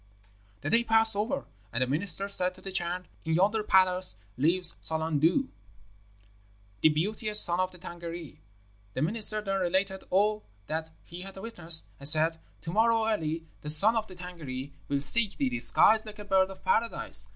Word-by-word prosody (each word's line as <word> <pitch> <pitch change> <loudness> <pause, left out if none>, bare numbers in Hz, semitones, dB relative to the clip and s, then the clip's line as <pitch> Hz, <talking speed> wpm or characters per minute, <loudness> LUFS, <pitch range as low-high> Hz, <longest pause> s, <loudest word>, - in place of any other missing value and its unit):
"The - - -5
day 230 +1 +2
passed 225 -1 +5
over, 240 +7 -4 0.3
and 120 +2 0
the - - -1
minister 180 +8 -1
said 185 -2 0
to - - -18
the 195 - -8
Chan, 180 0 -4 0.2
'In 160 0 -2
yonder 205 +5 0
palace 185 - +2 0.2
lives 170 +6 +3
Solangdu, 160 - -1 1.3
the 155 - +4
beauteous 210 +7 +3
son 175 -2 +5
of 185 0 -2
the 180 - -16
Tângâri.' 170 -3 -10 0.6
The 130 - -2
minister 215 +4 +6
then 195 -1 -3
related 190 +2 -2
all 210 +3 0 0.2
that 160 +4 -5
he 175 +2 -11
had 195 +1 -11
witnessed, 175 -6 -2
and 140 +1 +7
said, 160 +1 +4 0.2
'To 165 - -7
morrow 225 +1 +1
early 165 -6 -3 0.2
the 150 - -8
son 200 +10 +2
of 220 -1 -3
the 185 - -14
Tângâri 150 -7 -9 0.2
will 140 -1 -3
seek 205 +9 +1
thee, 275 -3 -1
disguised 220 -2 +2
like 215 0 -11
a 210 - -10
bird 190 -1 +1
of 190 -1 -14
Paradise. 230 0 -1
185 Hz, 175 wpm, -27 LUFS, 160-215 Hz, 1.3 s, and